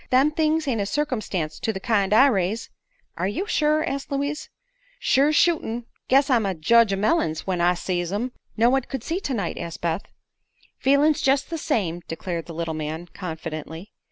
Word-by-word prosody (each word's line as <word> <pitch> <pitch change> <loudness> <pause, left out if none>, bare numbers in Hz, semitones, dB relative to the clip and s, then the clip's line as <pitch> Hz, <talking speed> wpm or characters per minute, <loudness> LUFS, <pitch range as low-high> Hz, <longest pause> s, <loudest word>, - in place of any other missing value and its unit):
Them 265 +4 +4
things 315 0 +1
ain't 230 -6 0
a 200 - -1
circumstance 210 - -2
to 225 - -1
the 190 - -5
kind 200 -2 +1
I 225 +6 +7
raise." 215 -3 0 0.5
"Are 180 - 0
you 215 - -2
sure?" 305 -5 +2
asked 275 +1 -4
Louise. 285 +2 -2 0.5
"Sure's 290 - +3
shootln'. 245 -9 +2 0.2
Guess 270 +1 +4
I'm 245 -5 +3
a 195 -2 -1
jedge 230 +7 +4
o' - - +2
mellings, 195 - 0
when 185 -2 -1
I 175 +1 +4
sees 175 0 -2
'em." 235 +6 -2 0.3
"No 235 +2 +4
one 270 0 +3
could 265 -1 -6
see 335 +6 -2
tonight," 255 - -3
said 165 -4 -6
Beth. 170 +2 -1 0.8
"Feelin's 285 +3 +3
jest 270 +4 +2
the 330 - -2
same," 185 - -1
declared 165 0 -4
the 165 - -8
little 165 -1 -2
man, 155 +2 -5
confidently. 160 +1 -6
220 Hz, 185 wpm, -24 LUFS, 175-280 Hz, 0.8 s, I